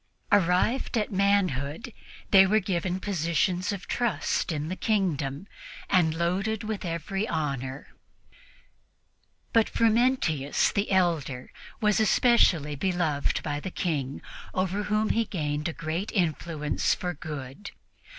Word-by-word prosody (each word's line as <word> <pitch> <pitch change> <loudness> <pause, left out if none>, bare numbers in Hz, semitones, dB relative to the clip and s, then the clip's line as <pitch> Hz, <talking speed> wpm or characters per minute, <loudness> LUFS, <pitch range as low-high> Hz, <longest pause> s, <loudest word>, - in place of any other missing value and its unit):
Arrived 205 +7 +2
at 215 - -1
manhood, 195 - 0 0.4
they 195 -1 +8
were 215 +3 +4
given 185 -1 -2
positions 180 0 0
of 195 -3 -5
trust 240 -5 -1
in 150 -1 -3
the 185 - -3
kingdom 170 -9 -1 0.5
and 165 -4 +3
loaded 195 +6 -1
with 215 -1 -4
every 180 +4 -3
honor. 140 -4 -3 1.7
Frumentius, 225 - +2
the 200 +1 -1
elder, 165 -9 0 0.3
was 210 -1 +3
especially 190 - +3
beloved 160 -3 0
by 145 -1 -2
the 190 - -5
King, 145 -7 -3 0.3
over 190 +2 -1
whom 215 +1 +1
he 230 - +2
gained 150 -6 -2
a - - -2
great 165 +5 -4
influence 160 -4 0
for 180 -1 -3
good. 150 +3 -7
180 Hz, 115 wpm, -27 LUFS, 150-205 Hz, 1.7 s, they